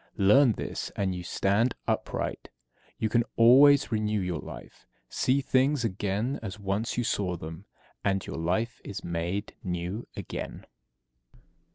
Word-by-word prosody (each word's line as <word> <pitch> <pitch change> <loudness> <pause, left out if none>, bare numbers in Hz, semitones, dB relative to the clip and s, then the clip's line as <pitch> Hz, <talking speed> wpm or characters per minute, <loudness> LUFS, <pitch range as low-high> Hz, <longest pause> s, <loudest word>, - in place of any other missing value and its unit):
Learn 115 +5 +6
this, - - -4
and 95 -2 0
you 90 - -5
stand 100 +7 +1
upright; - - -2 0.5
you 110 - 0
can 120 +2 +2
always 135 +5 +7
renew 105 -1 0
your 90 -4 -2
life. - - -11 0.2
See 135 +2 +1
things 130 0 +2
again 105 +5 -1
as 105 -2 -6
once 100 +4 -2
you 120 - +1
saw 95 -5 -1
them, 80 +4 -8 0.4
and 95 -1 0
your - - -6
life 95 +9 -1
is 100 0 -6
made 85 +4 -3
new 90 +4 -3
again. - - -6
105 Hz, 140 wpm, -28 LUFS, 95-120 Hz, 0.5 s, always